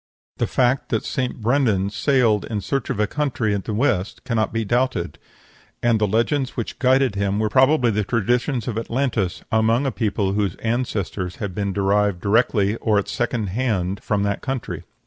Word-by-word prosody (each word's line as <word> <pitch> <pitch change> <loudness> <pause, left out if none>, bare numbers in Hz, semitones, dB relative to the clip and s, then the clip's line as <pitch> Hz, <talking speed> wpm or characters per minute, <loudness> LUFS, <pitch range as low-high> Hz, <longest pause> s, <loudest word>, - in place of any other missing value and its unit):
The - - 0
fact 130 +1 +1
that 110 - -1
St. 125 -2 -2
Brendan 110 -5 +2
sailed 115 -2 +2
in 105 -2 -3
search 135 +7 -2
of 125 -6 -2
a 105 - +3
country 125 -5 -1
in 100 - -1
the 110 - -5
west 105 -4 0
cannot 115 -4 0
be 115 -1 -1
doubted; 120 - -1 0.6
and 120 -2 +3
the 105 - +3
legends 125 +6 0
which 115 - -4
guided 130 -2 +3
him 100 0 -1
were 110 0 0
probably 130 -2 +4
the 105 0 0
traditions 120 +4 0
of 115 -2 -1
Atlantis 115 -6 -1
among 115 +4 +2
a 135 - +1
people 100 -4 -1
whose 100 -3 0
ancestors 105 -6 -2
had 100 -4 -5
been 100 +1 -2
derived 100 -1 +1
directly 105 0 +2
or 110 -3 +1
at 100 - 0
second 120 -4 -1
hand 100 -3 -1
from 105 -3 0
that 100 -1 -1
country. 130 -4 -4
110 Hz, 180 wpm, -22 LUFS, 100-125 Hz, 0.6 s, probably